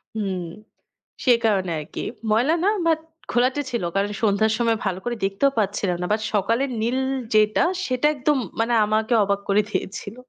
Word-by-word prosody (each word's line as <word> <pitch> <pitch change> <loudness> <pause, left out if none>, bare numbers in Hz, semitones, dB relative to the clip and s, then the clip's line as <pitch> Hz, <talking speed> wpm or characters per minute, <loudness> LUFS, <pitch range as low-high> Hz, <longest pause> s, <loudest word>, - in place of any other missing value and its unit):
হুম, 195 -4 -2 0.8
সে 250 - +6
কারণে 190 -5 +1
আর 150 - -7
কি। - - -4 0.3
ময়লা 245 +9 +3
না, - - +3 0.2
বাট 320 -1 +3 0.3
ঘোলাটে 255 +4 +2
ছিল। 235 -6 -2
কারণ 200 +1 +1
সন্ধ্যার 215 +1 +3
সময় 230 -2 +2
ভালো 190 -1 -1
করে 240 0 -1
দেখতেও 200 +8 +1
পাচ্ছিলাম 195 -3 0
না। - - -1
বাট 215 - -1
সকালের 230 +7 +1
নীল 240 +3 0 0.4
যেটা, 215 0 +4 0.3
সেটা 255 +3 +1
একদম 285 +1 +1 0.2
মানে 235 +1 +1
আমাকে 220 +3 0
অবাক 200 0 0
করে 205 +2 +4
দিয়েছিল। 200 +1 -4
220 Hz, 170 wpm, -23 LUFS, 200-245 Hz, 0.8 s, সে